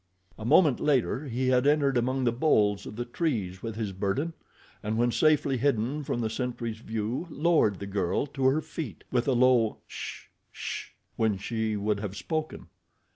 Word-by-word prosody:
A 110 - -6
moment 150 0 +5
later 140 0 +1
he 130 +1 0
had 125 +1 +3
entered 145 -2 +3
among 130 +2 +1
the 120 - +3
boles 105 -6 +2
of - - -8
the 120 +2 -3
trees 115 - -2
with 115 -2 -5
his 110 -3 -3
burden, 100 - -1 0.5
and 110 +1 -2
when 120 +1 +3
safely 150 -1 +3
hidden 135 +2 0
from 120 - -2
the 110 - 0
sentry's 115 -2 -3
view 115 +7 -3
lowered 155 - +2
the 100 - -6
girl 100 +3 0
to 135 -2 -3
her 145 +4 +3
feet, 140 - -7
with 125 0 +1
a 135 - +3
low, 120 -3 +4
"sh - - -8 0.2
sh," - - -5 0.3
when 110 -3 +2
she 110 +2 -2
would 105 0 0
have 100 -1 -5
spoken. 155 -1 -3
120 Hz, 180 wpm, -28 LUFS, 110-140 Hz, 0.5 s, moment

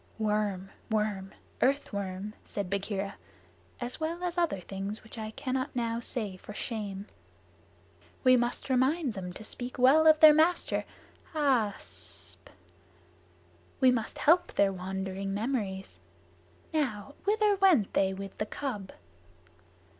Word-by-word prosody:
"Worm 210 -3 0 0.2
worm 210 -3 -1 0.3
earth 275 -1 +2
worm," 200 +1 -4
said 200 -3 -4
Bagheera, 200 0 -2 0.6
"as 245 0 -4
well 330 +3 -2
as 355 -1 -1
other 340 - +1
things 195 +3 -5
which 220 - -12
I 215 0 -4
cannot 260 +4 -3
now 230 -1 0
say 215 -5 -3
for 205 +2 -10
shame." 205 -5 -4 1.2
"We 255 -1 +7
must 240 +2 -1
remind 260 +2 +2
them 185 -3 -5
to 210 - -9
speak 245 +3 -6
well 275 +6 +6
of 310 -1 +7
their 310 -1 +10
master. 320 +4 +2 0.5
Aaa 255 -9 +2
ssp! 85 -1 -7 1.3
We 260 -1 +6
must 230 -3 -2
help 345 +4 +4
their 195 -1 +3
wandering 190 +1 -3
memories. 200 - -3 0.7
Now, 275 -5 -1
whither 420 0 +3
went 360 - +4
they 190 -1 +3
with 195 0 -7
the 210 - -1
cub?" 210 -9 -4
220 Hz, 130 wpm, -30 LUFS, 195-275 Hz, 1.3 s, their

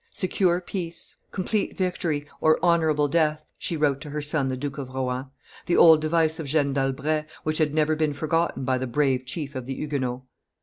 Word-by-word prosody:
"Secure 185 - +1
peace, 170 -2 -6 0.2
complete 200 +2 -2
victory, 170 -5 -1 0.2
or 155 0 +5
honorable 160 -4 +3
death," 155 0 +1
she 165 - -2
wrote 145 -2 +1
to 150 - -7
her 150 +1 -3
son 145 -1 0
the 130 -1 -2
Duke 140 +1 -4
of 135 -2 -5
Rohan: 130 0 -3 0.4
the 175 - +2
old 160 -2 +8
device 160 +1 +1
of 155 - -4
Jeanne 140 -1 +1
d'Albret, 140 +3 0 0.2
which 155 +1 -1
had 150 -1 +1
never 155 0 +2
been 155 -1 0
forgotten 155 -2 -1
by 130 -1 +1
the 130 - -2
brave 130 0 +1
chief 145 -1 -4
of 130 -2 -6
the 135 - -3
Huguenots. 130 -4 -3
150 Hz, 190 wpm, -25 LUFS, 135-160 Hz, 0.4 s, old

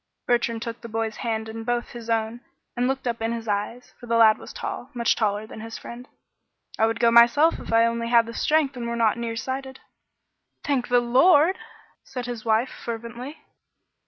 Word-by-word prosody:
Bertrand 235 -1 0
took 230 0 -6
the 235 - -9
boy's 225 0 -3
hand 220 -2 -3
in 225 +1 -7
both 240 +1 -2
his 235 -1 -9
own 225 +1 -1 0.3
and 245 +1 +1
looked 265 0 -2
up 235 -2 -2
in 225 +1 -1
his 230 -1 -6
eyes, 210 +4 -3
for 240 - -11
the 230 - +1
lad 220 -1 +6
was - - -10
tall, 245 - -6
much 235 -1 +2
taller 210 -1 -1
than 220 - -10
his 225 0 -7
friend. 245 +2 -10 0.7
"I 220 - +4
would 225 0 -2
go 235 - +4
myself 240 +8 +5
if - - -8
I 230 0 +5
only 230 0 -1
had 235 -1 +4
the 230 - -8
strength 300 +1 +1
and 240 -1 -4
were 235 - -2
not 230 0 +2
near 230 -1 -3
sighted." 265 +2 -5 0.8
"Thank 275 -5 0
the 245 0 +3
Lord!" 290 +8 +4 0.4
said 250 -2 -6
his 240 -3 -6
wife, 225 +3 +2
fervently. 235 +5 -7
235 Hz, 200 wpm, -24 LUFS, 225-245 Hz, 0.8 s, lad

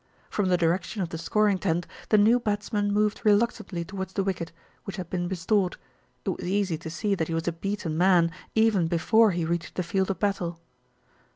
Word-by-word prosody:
From 200 -3 0
the 180 - +4
direction 180 +4 0
of 170 - -4
the 165 - -5
scoring 205 +3 +2
tent, 175 -2 0 0.2
the 215 - +5
new 220 +4 +5
bats 205 -3 -3
man 205 -1 +1
moved 210 0 +1
reluctantly 205 -5 +1
towards 190 0 -6
the 195 - 0
wicket, 175 -4 -3 0.3
which 195 - -6
had 180 -4 -7
been 175 -1 -1
restored. 190 +1 0 0.5
It - - 0
was - - -4
easy 190 -2 0
to 160 - -7
see 200 +5 -1
that 165 -5 -1
he 165 - -2
was 165 +1 -2
a - - +3
beaten 170 -2 -3
man, 175 -2 +4 0.2
even 220 -6 +3
before 215 +7 +4
he 175 -3 -1
reached 170 -2 -3
the 185 - -1
field 190 +2 0
of 195 - -1
battle. 180 -5 -1
190 Hz, 205 wpm, -26 LUFS, 170-205 Hz, 0.5 s, the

